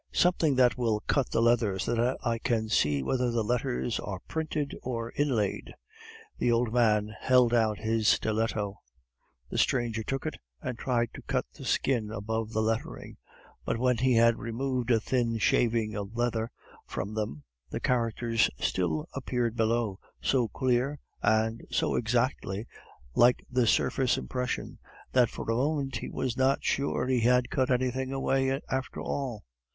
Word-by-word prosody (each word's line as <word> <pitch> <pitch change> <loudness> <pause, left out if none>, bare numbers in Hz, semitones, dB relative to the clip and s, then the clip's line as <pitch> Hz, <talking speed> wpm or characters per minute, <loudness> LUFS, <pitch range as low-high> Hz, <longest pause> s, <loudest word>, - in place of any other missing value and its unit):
"Something 170 -5 +3
that 125 -1 +4
will 110 -3 +1
cut 135 +1 0
the 115 - +1
leather, 115 -5 +3
so 105 - -1
that 120 +2 +1
I 115 -1 0
can 115 -3 0
see 75 -8 +2
whether 125 - +1
the 115 -1 0
letters 120 +1 -1
are 95 -3 -5
printed 155 -2 -2
or 115 -2 -4
inlaid." 125 -9 -1 0.6
The 120 - +2
old 115 -1 +1
man 110 -3 +2
held 125 -2 +4
out 110 -3 +2
his 110 -1 0
stiletto. 110 -2 +1 0.7
The - - -1
stranger 120 -3 +1
took 135 +6 -3
it 155 - -3 0.2
and 130 -3 -4
tried 120 -1 0
to - - -9
cut - - -1
the - - -10
skin 120 -6 +1
above 110 +1 -3
the 110 -1 0
lettering; 110 +1 -3 0.5
but - - -1
when 125 0 +2
he 130 -1 +3
had 115 0 +4
removed 125 +1 -2
a 115 -2 +4
thin 115 -1 0
shaving 110 +1 +2
of 105 +2 -5
leather 120 -1 0 0.4
from 100 +3 -4
them, 105 -10 -3 0.3
the - - -3
characters 115 -1 +1
still 80 -2 -1
appeared 125 -4 -1
below, 115 -3 0 0.2
so 125 -4 +2
clear 130 +4 0 0.2
and 110 +1 +2
so - - 0
exactly 115 -3 0 0.5
like 120 - +4
the 125 -2 +2
surface 125 +3 +2
impression, 125 -1 -3 0.3
that 125 -3 +4
for - - -7
a - - +1
moment 140 +1 0
he - - -6
was 125 -2 -2
not 135 +2 +2
sure 140 -2 0
that 130 - 0
he 125 - +3
had 125 +1 +3
cut 130 -1 +1
anything 130 +1 0
away 135 0 +1
after 130 0 -3
all. 125 -7 -3
120 Hz, 160 wpm, -29 LUFS, 110-130 Hz, 0.7 s, that